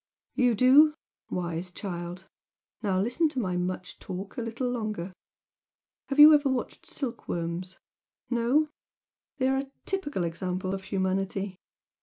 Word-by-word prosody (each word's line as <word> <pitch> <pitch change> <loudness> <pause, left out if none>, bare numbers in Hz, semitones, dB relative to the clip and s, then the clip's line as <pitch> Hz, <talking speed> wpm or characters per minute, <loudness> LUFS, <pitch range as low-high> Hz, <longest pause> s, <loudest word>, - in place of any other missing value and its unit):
"You 245 -3 +3
do? 280 +7 +7 0.3
Wise 175 0 -3
child! 180 -1 -6 0.5
Now 195 -3 +1
listen 245 - +2
to 285 -4 -3
my 185 -6 -1
much 180 0 -3
talk 190 +2 -6
a - - -3
little 230 +2 -2
longer! 215 -7 -3 1.0
Have 275 - -2
you 300 +1 +11
ever 290 -2 +4
watched 260 -2 -3
silkworms? 180 - -4 0.5
No? 250 +6 +2 0.7
They 260 -2 +2
are 270 +1 +1 0.2
typical 290 - -1
examples 185 +2 -2
of 190 -1 -5
humanity. 195 0 -1
200 Hz, 125 wpm, -28 LUFS, 185-260 Hz, 1.0 s, you